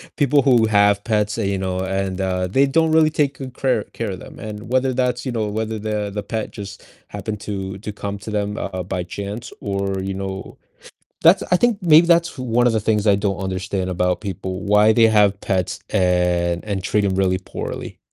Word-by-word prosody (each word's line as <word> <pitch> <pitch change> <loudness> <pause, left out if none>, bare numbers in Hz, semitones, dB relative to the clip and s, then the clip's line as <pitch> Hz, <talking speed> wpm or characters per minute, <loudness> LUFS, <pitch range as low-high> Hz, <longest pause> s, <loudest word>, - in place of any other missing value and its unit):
people 145 -1 +3
who 120 -5 +4
have 100 -1 +3
pets 105 -2 0
that, 110 -4 -1
you 100 -1 0
know 95 -1 -2
and, 95 0 -2
uh, 90 -1 0
they 135 +9 +3
don't 160 +3 +2
really 160 -1 +5
take 140 -3 0
good 130 -1 -7
crare 130 -6 +1
care 115 -3 -3
of 95 - -6
them, - - -12
and 105 +1 -7
whether 130 0 +2
that's 125 -1 -1
you 130 - -2
know, 110 -3 -1
whether 110 +1 -3
the 105 -1 -2
the 105 - -2
pet 110 +1 -4
just 100 -5 -9 0.2
happened 105 -2 -5
to 95 -2 -5
to 105 0 -6
come 100 -1 -5
to 105 - -8
them, 105 0 -2
uh, 90 -1 -4
by 90 0 -3
chance, 100 +6 -6
or, 100 -1 -2
you 95 0 -3
know 95 0 -6 0.7
That's - - +6
I - - +7
think 235 0 +2
maybe 165 0 +6
that's 170 -1 +3
one 120 -1 +1
of 120 - +4
the 110 - +2
things 105 0 0
I 100 -1 +5
don't 100 -2 -1
understand 95 0 -2
about 90 0 0
people, 95 -1 -5
why 105 +2 +5
they 115 0 +5
have 105 -2 +3
pets, 95 -2 -1
and 90 -1 +1
and 100 -3 -3
treat 105 +1 +1
'em 95 - +1
really 95 -1 +2 0.2
poorly. - - -5
105 Hz, 210 wpm, -21 LUFS, 95-115 Hz, 0.7 s, I